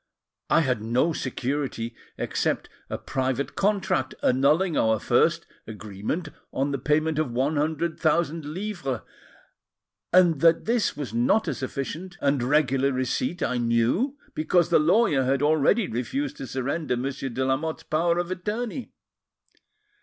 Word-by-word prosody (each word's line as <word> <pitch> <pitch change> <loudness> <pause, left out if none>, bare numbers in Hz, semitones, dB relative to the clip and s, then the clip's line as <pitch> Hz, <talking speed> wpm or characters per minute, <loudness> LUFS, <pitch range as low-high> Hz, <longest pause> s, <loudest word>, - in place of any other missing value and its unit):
I 165 - +5
had 125 -7 0
no 125 +9 +1
security 130 -3 -3 0.2
except - - -1 0.2
a - - -3
private 130 +1 -2
contract 195 -10 0
annulling 150 +7 +3
our 110 0 +3
first 165 +10 +2 0.2
agreement 110 - -4 0.2
on 140 +2 -1
the 140 - -2
payment 155 +3 +1
of 155 -4 0
one 135 +6 0
hundred 160 +2 -1
thousand 165 0 +1
livres, 170 - -4 1.1
and 175 -4 +5
that 165 0 +4
this 235 -1 +1
was 140 -6 -5
not 120 - +2
a - - 0
sufficient 155 +7 -5
and 140 -2 +1
regular 135 0 +2
receipt 130 +5 -1
I 125 - 0
knew, 120 - +1 0.2
because 170 +2 +2
the 170 - +5
lawyer 160 - +3
had 135 +2 +1
already 155 +8 +3
refused 265 - -3
to 135 - -6
surrender 130 +2 -2
Monsieur 135 +1 -3
de 130 +2 -2
Lamotte's 145 +5 -1
power 170 +2 +1
of 175 +1 -2
attorney. 220 +6 -4
145 Hz, 140 wpm, -25 LUFS, 130-170 Hz, 1.1 s, I